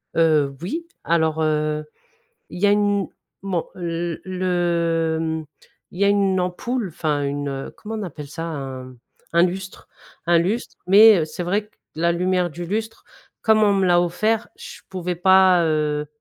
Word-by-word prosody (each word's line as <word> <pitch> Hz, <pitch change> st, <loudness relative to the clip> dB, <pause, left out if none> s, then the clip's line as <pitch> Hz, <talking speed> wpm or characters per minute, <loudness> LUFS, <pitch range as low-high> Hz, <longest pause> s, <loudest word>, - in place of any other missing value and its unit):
Heu, 150 Hz, -4 st, +3 dB
oui, 325 Hz, -, -4 dB, 0.2 s
alors, 160 Hz, -1 st, +1 dB
heu, 155 Hz, 0 st, 0 dB, 0.7 s
il 175 Hz, -, -8 dB
y 205 Hz, -, +4 dB
a -, -, +5 dB
une 205 Hz, -1 st, +2 dB, 0.4 s
bon, 185 Hz, -4 st, -2 dB
heu, 170 Hz, -1 st, -3 dB
le 170 Hz, -3 st, 0 dB
mmh 160 Hz, -1 st, -3 dB, 0.5 s
il 180 Hz, -, -8 dB
y -, -, +4 dB
a -, -, +4 dB
une 195 Hz, -2 st, +2 dB
ampoule 205 Hz, +5 st, -2 dB
enfin 150 Hz, -3 st, -2 dB
une, 145 Hz, 0 st, -2 dB
heu, 135 Hz, 0 st, -5 dB
comment 220 Hz, +1 st, -7 dB
on 215 Hz, -, -4 dB
appelle 150 Hz, -5 st, -7 dB
ça? 165 Hz, +3 st, -6 dB
Un 130 Hz, -5 st, -6 dB, 0.4 s
un 170 Hz, +1 st, +4 dB
lustre 190 Hz, +1 st, -5 dB, 0.4 s
un 170 Hz, -1 st, +5 dB
lustre 200 Hz, +8 st, -2 dB
mais, 205 Hz, -1 st, +8 dB
heu, -, -, +1 dB
c'est 170 Hz, +3 st, -6 dB
vrai 205 Hz, +4 st, -1 dB
que -, -, -38 dB, 0.2 s
la 170 Hz, +2 st, +1 dB
lumière 180 Hz, 0 st, 0 dB
du 175 Hz, +3 st, -7 dB
lustre, 220 Hz, +4 st, -4 dB, 0.4 s
comme 220 Hz, -1 st, +3 dB
on 205 Hz, -1 st, +4 dB
me 195 Hz, -1 st, +2 dB
l'a 175 Hz, 0 st, +4 dB
offert, 215 Hz, +6 st, 0 dB
je -, -, -10 dB
pouvais 180 Hz, -1 st, -3 dB
pas, 185 Hz, 0 st, +5 dB
heu, 150 Hz, -1 st, 0 dB
175 Hz, 175 wpm, -22 LUFS, 160-195 Hz, 0.7 s, mais